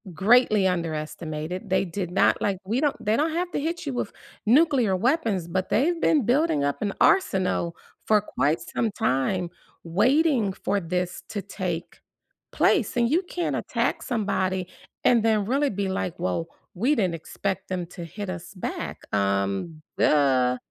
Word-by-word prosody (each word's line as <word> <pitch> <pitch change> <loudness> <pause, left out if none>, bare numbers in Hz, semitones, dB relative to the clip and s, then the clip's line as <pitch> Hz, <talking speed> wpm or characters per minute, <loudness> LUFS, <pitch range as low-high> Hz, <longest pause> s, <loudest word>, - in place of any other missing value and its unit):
Greatly 215 +1 +4
underestimated, 165 +1 -3
they 190 +1 +2
did 180 0 -4
not 180 - +3
like 200 -2 0
we 230 +7 0
don't 295 -2 +2
they 215 +2 +3
don't 315 +6 +1
have 350 +2 -1
to - - -1
hit 330 +4 -3
you 280 - -3
with 245 -4 -3 0.4
nuclear 255 - +4
weapons, 225 - 0
but 185 +2 -2
they've 330 +8 +1
been 295 -7 +3
building 250 - +2
up 145 0 -1
an 205 -2 0
arsenal 190 - +2 0.3
for 215 -1 +5
quite 160 -6 0
some 230 - -2
time, 170 +4 0 0.3
waiting 235 - +2
for 200 +1 -1
this 180 0 -3
to 205 -2 -4
take 180 -3 -5 0.5
place, 275 - +2
and 235 +1 +2
you 335 +4 +3
can't 350 -1 -2
attack - - -1
somebody, 190 -6 -1 0.4
and 235 -2 +5
then 215 -2 +2
really 275 +6 +1
be 200 -1 -2
like, 185 -2 -3
"Well, 170 -1 -2 0.3
we 250 +11 +1
didn't 185 -8 +1
expect 190 +3 -4
them 180 -2 -2
to 175 0 -9
hit 200 +5 -6
us 185 +1 -8
back," 185 - -5
um, 100 - -1 0.2
"Duh". 130 -4 +3
195 Hz, 160 wpm, -25 LUFS, 170-245 Hz, 0.5 s, for